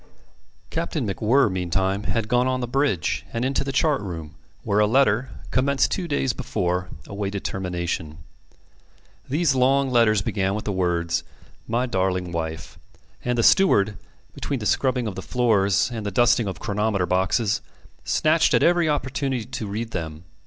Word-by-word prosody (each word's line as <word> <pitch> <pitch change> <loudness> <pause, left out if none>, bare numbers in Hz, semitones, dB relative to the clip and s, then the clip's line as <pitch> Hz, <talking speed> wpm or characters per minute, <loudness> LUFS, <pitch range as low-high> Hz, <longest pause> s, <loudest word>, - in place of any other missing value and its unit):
Captain 115 - -2
MacWhirr 110 +4 +2
meantime 95 +2 -1
had 115 -2 -1
gone 125 +2 +2
on 130 0 0
the 125 - -1
bridge, 125 - 0
and 115 +2 -2
into 135 +1 0
the 135 - -3
chart 145 -1 +2
room, 80 -5 -6 0.3
where 100 +1 +1
a 105 - +4
letter, 125 0 +3 0.2
commenced 135 +3 +2
two 180 -2 -2
days 140 -5 0
before, 90 -1 -2 0.2
awaited 100 0 -4
termination. 85 -4 -3 1.1
These 150 +1 +2
long 135 +1 +2
letters 110 -4 +3
began 95 -1 -1
with 110 - -5
the 105 - -1
words, 85 -3 0 0.4
"My 120 +3 0
darling 95 -5 -1
wife," 80 -1 -5 0.4
and 125 0 -1
the 115 - +2
steward, 110 - +4 0.4
between 140 - -3
the 110 - -6
scrubbing 130 +1 +1
of 105 - -3
the - - -6
floors 105 -4 +2
and 110 -2 -4
the 100 - -2
dusting 120 +1 +3
of 95 -4 -5
chronometer 105 -2 0
boxes, 95 +4 +1 0.4
snatched 155 +1 +3
at - - +3
every 175 -2 +3
opportunity 135 -4 -1
to 115 -3 -5
read 110 +3 -4
them. 80 -3 -5
110 Hz, 160 wpm, -23 LUFS, 95-130 Hz, 1.1 s, a